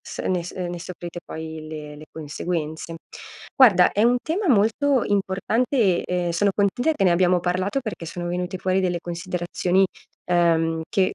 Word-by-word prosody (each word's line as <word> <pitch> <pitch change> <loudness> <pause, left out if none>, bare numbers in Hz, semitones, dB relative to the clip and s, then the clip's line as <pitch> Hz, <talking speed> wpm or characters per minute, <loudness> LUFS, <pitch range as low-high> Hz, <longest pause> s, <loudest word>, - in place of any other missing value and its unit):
s - - -10
ne 185 -1 0 0.2
uhm, 180 -2 -3
ne 175 - -6
soffrite 175 0 -7
poi 160 0 -7
le 150 -1 -7
le 150 +1 -12
conseguenze. 160 +1 -4 0.6
Guarda, 200 -9 +6
è 205 - +1
un 240 +2 +4
tema 360 +3 -1
molto 245 +4 +3
importante 205 +1 +1
e, - - -12
ehm, 180 -1 -1
sono 200 +4 +2
contenta 205 +9 +1
che 210 -10 0
ne 180 - +5
abbiamo 180 +1 +3
parlato 185 +7 -1
perché 215 -9 -5
sono 175 +1 -5
venute 180 +1 -3
fuori 185 +1 +1
delle 180 -2 0
considerazioni, 175 +2 0 0.4
uhm, 165 -2 +2
che 190 -2 +1
180 Hz, 165 wpm, -23 LUFS, 170-200 Hz, 0.6 s, Guarda